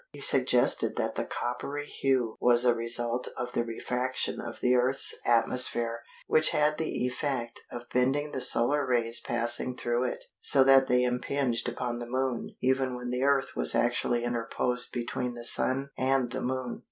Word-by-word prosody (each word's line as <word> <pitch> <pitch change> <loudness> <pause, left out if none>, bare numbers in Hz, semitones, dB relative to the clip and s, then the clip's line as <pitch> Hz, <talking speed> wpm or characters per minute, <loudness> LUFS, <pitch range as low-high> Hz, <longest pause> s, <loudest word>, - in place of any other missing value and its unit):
He - - -12
suggested - - +3
that - - -2
the - - -3
coppery 140 +4 -4
hue 130 -6 -1
was 120 0 +3
a 120 - +5
result 120 +1 -1
of 125 0 -4
the 120 - -1
refraction 125 +2 -3
of - - -8
the 125 - +2
Earth's 125 +2 +4
atmosphere 115 0 +3 0.2
which 155 0 +3
had 150 0 +1
the 155 -5 -2
effect 125 -2 -3
of 120 0 -8
bending 135 +4 0
the 130 - -4
solar 140 +6 +2
rays 120 -3 +1
passing 120 +2 0
through 120 +1 -1
it, 125 - -4 0.2
so 135 - +5
that 135 0 +5
they 125 0 +2
impinged 125 0 -1
upon 120 0 -4
the 120 0 -7
Moon 130 -1 -3
even 130 0 +1
when 125 0 -6
the 125 0 -2
Earth 140 0 +1
was - - +3
actually 120 0 0
interposed 120 +1 -2
between 120 0 -4
the 120 0 -7
Sun 135 +3 +1
and 130 -2 0
the 130 - -4
Moon. 130 -1 -4
125 Hz, 170 wpm, -28 LUFS, 120-130 Hz, 0.2 s, a